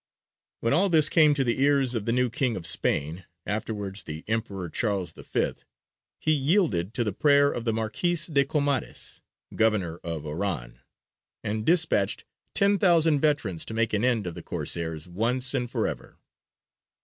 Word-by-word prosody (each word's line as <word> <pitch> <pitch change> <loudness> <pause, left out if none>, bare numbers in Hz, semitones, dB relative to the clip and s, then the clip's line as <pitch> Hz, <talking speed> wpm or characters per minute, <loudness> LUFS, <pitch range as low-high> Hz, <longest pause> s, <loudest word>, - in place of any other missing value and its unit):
When 115 - +1
all 190 +6 +3
this 155 -3 +4
came 155 -3 +5
to 140 - +1
the 120 +1 -1
ears 140 -3 +3
of 115 -3 -3
the - - +2
new 125 +1 +2
King 125 -1 0
of 90 - -4
Spain, 80 +2 +1 0.2
afterwards 105 -2 -3
the 80 -2 -8
Emperor 105 -5 -3
Charles 95 -1 -1
V, - - -2 0.7
he 155 - 0
yielded 135 - +1
to 120 - +1
the 105 - -2
prayer 145 -1 +4
of 120 - -5
the 115 - +2
Marquis 115 +11 -1 0.2
de 140 -1 +4
Comares, 140 -2 -1 0.3
Governor 105 -7 +1
of 80 -3 -5
Oran, 75 -7 -4 0.6
and 110 +2 -3
despatched 160 - +2 0.3
ten 200 0 +3
thousand 165 -5 +4
veterans 135 - 0
to 110 - -6
make 115 -1 0
an 105 +1 +1
end 120 -5 +1
of 90 - -4
the - - -8
Corsairs 80 -1 -2
once 125 +8 +1
and 125 -3 -1
for - - -1
ever. - - -7
115 Hz, 165 wpm, -26 LUFS, 95-140 Hz, 0.7 s, came